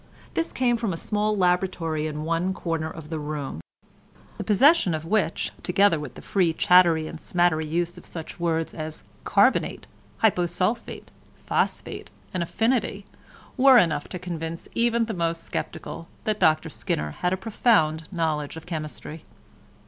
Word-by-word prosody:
This 330 - -1
came 245 -2 +1
from 225 -5 -1
a - - -4
small 210 +3 0
laboratory 180 -4 +1
in 150 0 -4
one 170 +4 0
corner 165 -3 -2
of 160 -1 -10
the 160 - -2
room—the 145 - -8
possession 225 - +4
of 155 0 -5
which, 175 -3 0
together 185 -2 +3
with 150 - -7
the - - -11
free 180 -5 +2
chattery 170 -2 +5
and 165 - -8
smattery 175 -3 +1
use 170 +2 -2
of - - -16
such 165 +1 -8
words 165 -1 0
as 155 -1 -6 0.2
"carbonate," - - +2 0.4
"hyposulphite," 185 +3 0 0.4
"phosphate," - - -1 0.2
and 185 - -1
"affinity," 225 +2 0 0.5
were 265 -1 +7
enough 155 -9 +2
to 185 - -6
convince 165 -2 -5
even 235 0 +2
the 225 - -4
most 165 -2 -2
sceptical 165 - -5 0.2
that 215 -1 -1
Dr 155 0 +3
Skinner 75 0 -2
had 180 - +1
a 185 - +1
profound 180 -7 +1
knowledge 160 -4 -1
of 160 - -10
chemistry. 155 -1 -6
170 Hz, 150 wpm, -25 LUFS, 160-200 Hz, 0.5 s, were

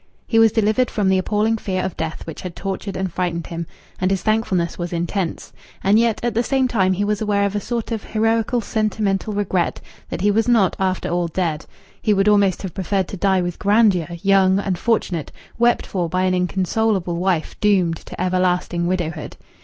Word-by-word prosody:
He 225 - +2
was 225 -1 +6
delivered 220 +3 +2
from 200 -3 0
the 190 0 +3
appalling 215 +3 +1
fear 185 -3 -2
of 185 - -4
death 160 0 -4
which 165 - -7
had 180 -2 -7
tortured 195 0 -4
and 190 -3 -3
frightened 175 -2 -2
him, 170 -1 -5 0.3
and 185 - +1
his 195 -1 -1
thankfulness 215 -6 0
was 175 0 -3
intense; 175 +1 -3 0.3
and 205 +3 +4
yet 230 -2 +2
at 240 -1 0
the 230 - +2
same 265 +1 +1
time 190 -6 +2
he 195 +2 -1
was 210 0 -1
aware 205 -1 +1
of 200 0 -2
a - - +1
sort 235 +2 -4
of 220 -3 -2
heroical 225 +2 +1
sentimental 215 -2 -1
regret 195 -4 -1 0.3
that - - -4
he 205 +2 +3
was 225 +3 +1
not, 225 -7 +3
after 185 -1 -1
all, 175 0 0
dead; 165 -3 -2 0.3
he 210 - +2
would 195 +1 +2
almost 200 -3 +3
have 185 -4 -5
preferred 190 0 -1
to - - -5
die 190 0 +2
with 175 -1 -4
grandeur, 200 -5 +3 0.2
young, 195 -1 +4
unfortunate, 190 -3 -1 0.3
wept 240 0 +3
for 175 -3 -2
by 185 +2 0
an 185 0 +2
inconsolable 185 0 0
wife 175 -2 0
doomed 185 -6 +2
to - - -11
everlasting 180 -1 0
widowhood. 175 -3 -3
195 Hz, 195 wpm, -21 LUFS, 180-215 Hz, 0.3 s, was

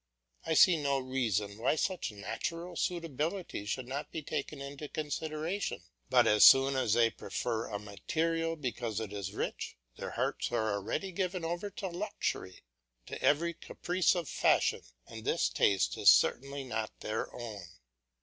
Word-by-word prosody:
I 160 - +1
see 170 -1 +6
no 140 -1 +1
reason 115 -6 -1
why 125 +6 +2
such 180 - -1
natural 165 - -5
suitability 165 - -2
should 125 +4 -3
not 140 +3 -4
be 160 - -5
taken 145 +1 -4
into 140 +2 -7
consideration; 155 +5 -3 0.3
but - - +5
as 105 0 +5
soon 135 +1 +8
as 130 -5 +2
they 115 -1 +4
prefer 115 -2 -3
a 105 - -3
material 165 +11 -1
because 120 -6 -3
it 105 -2 -5
is 100 -2 -4
rich, - - -4 0.2
their - - -5
hearts - - -2
are 110 -1 +1
already 105 - -2
given 185 -1 -2
over 175 +5 -3
to 195 0 -5
luxury, 175 - -4 0.4
to - - -7
every 170 +4 +3
caprice 180 +2 0
of 175 -4 -2
fashion, - - +2 0.2
and - - -9
this - - +1
taste 100 -2 +2
is - - +7
certainly 140 - +3
not 110 -4 -4
their 110 +1 -3
own. 110 -4 -6
140 Hz, 155 wpm, -32 LUFS, 110-165 Hz, 0.4 s, soon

